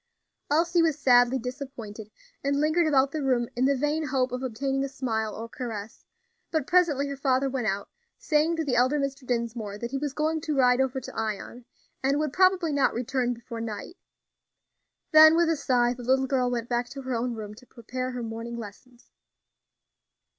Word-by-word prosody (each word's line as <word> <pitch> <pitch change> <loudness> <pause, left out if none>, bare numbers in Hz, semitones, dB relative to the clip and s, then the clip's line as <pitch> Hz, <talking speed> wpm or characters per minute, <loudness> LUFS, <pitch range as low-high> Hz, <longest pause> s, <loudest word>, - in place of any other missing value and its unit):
Elsie 335 +3 +3
was 320 -3 +2
sadly 245 -2 +4
disappointed, 250 -5 -7 0.3
and 280 0 +1
lingered 315 +3 +2
about 275 -2 +3
the 310 - -3
room 250 -3 +1
in 250 +2 +1
the 280 0 +2
vain 295 +3 0
hope 260 -1 0
of 250 0 -3
obtaining 270 +2 -2
a 275 - -3
smile 220 -5 -2
or 225 +1 -6
caress; 225 -3 -7 0.5
but 315 -5 -1
presently 310 -6 +3
her 280 - -4
father 270 -1 +1
went 260 -4 -2
out, 200 0 -1 0.3
saying 310 +2 +1
to 325 - -1
the 265 - 0
elder 255 +5 +3
Mr. 275 -1 -4
Dinsmore 230 -4 -2
that 235 +2 -5
he 275 - -2
was 290 -1 -3
going 310 +2 -1
to 305 -1 -2
ride 250 -1 +4
over 265 0 0
to 260 - -10
Ion, 225 +2 -4 0.4
and 275 +2 +1
would 300 -2 -1
probably 370 -4 +3
not 280 -1 +2
return 245 0 -1
before 235 0 -8
night; 225 - -6 1.2
then, 315 +1 +9
with 340 -1 +3
a - - +2
sigh, 245 -4 +2
the 250 - -10
little 265 +2 +2
girl 255 -2 +1
went 240 -1 -2
back 240 0 -1
to 275 -1 -8
her 260 0 -3
own 240 +1 -1
room 210 -1 -7
to 240 +4 -16
prepare 255 +2 -5
her 250 -1 -5
morning 230 +1 -5
lessons. 235 +3 -12
260 Hz, 190 wpm, -27 LUFS, 240-285 Hz, 1.2 s, then